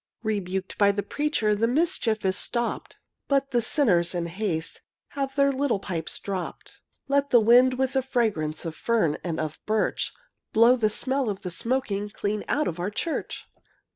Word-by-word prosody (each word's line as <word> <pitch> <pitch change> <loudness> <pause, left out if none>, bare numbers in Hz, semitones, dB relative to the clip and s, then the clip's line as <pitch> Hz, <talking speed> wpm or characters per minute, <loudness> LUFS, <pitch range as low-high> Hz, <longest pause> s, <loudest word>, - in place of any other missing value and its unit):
Rebuked 190 -3 -3
by 200 -1 +6
the 200 0 -2
preacher 290 -8 0
The 220 +2 +1
mischief 245 - +1
is 190 0 +2
stopped, 235 +3 -2 0.3
But 275 -1 +1
the 240 -2 +2
sinners, 185 - +2
in 170 -1 -1
haste, 170 -2 -3 0.3
Have 275 -1 -3
their 280 -1 +4
little 270 -4 0
pipes 170 -5 -4
dropped. 190 -3 -6 0.3
Let 280 0 +2
the 240 - +6
wind, 245 +3 +5
with 265 0 0
the 265 - +2
fragrance 210 - -1
Of 160 -1 -4
fern 215 -10 +1
and 165 -3 -2
black 155 -1 -4
birch, 215 0 0 0.4
Blow 230 +3 +6
the 220 -4 +1
smell 260 +2 -1
of 195 -2 -4
the 180 - -4
smoking 210 -1 -1
Clean 205 0 -3
out 300 - +1
of 165 - -3
the 180 +3 -2
church! 315 +10 -3
220 Hz, 170 wpm, -26 LUFS, 190-260 Hz, 0.4 s, by